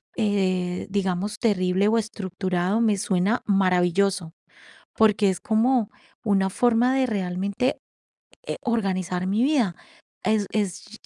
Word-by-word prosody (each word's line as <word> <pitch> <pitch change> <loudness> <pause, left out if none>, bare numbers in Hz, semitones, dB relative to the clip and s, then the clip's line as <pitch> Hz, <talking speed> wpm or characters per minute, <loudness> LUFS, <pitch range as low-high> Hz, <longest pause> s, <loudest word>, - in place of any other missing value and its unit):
eh, 185 -5 0
digamos, 195 +1 -2
terrible 190 -2 +1
o 230 - +2
estructurado, 190 -2 -2
me 215 -3 +2
suena 195 +4 0
maravilloso, 185 -2 +1 0.6
porque 210 -2 +4
es 185 - -2
como 225 0 +1 0.4
una 195 -2 +2
forma 245 +4 +2
de 265 - +2
realmente, 200 +3 -1 0.7
eh, - - -2
organizar 185 -6 -1
mi 210 +5 +1
vida. 255 - +2 0.5
Es 210 0 +1
es, 210 +1 -3
200 Hz, 115 wpm, -24 LUFS, 185-220 Hz, 0.7 s, porque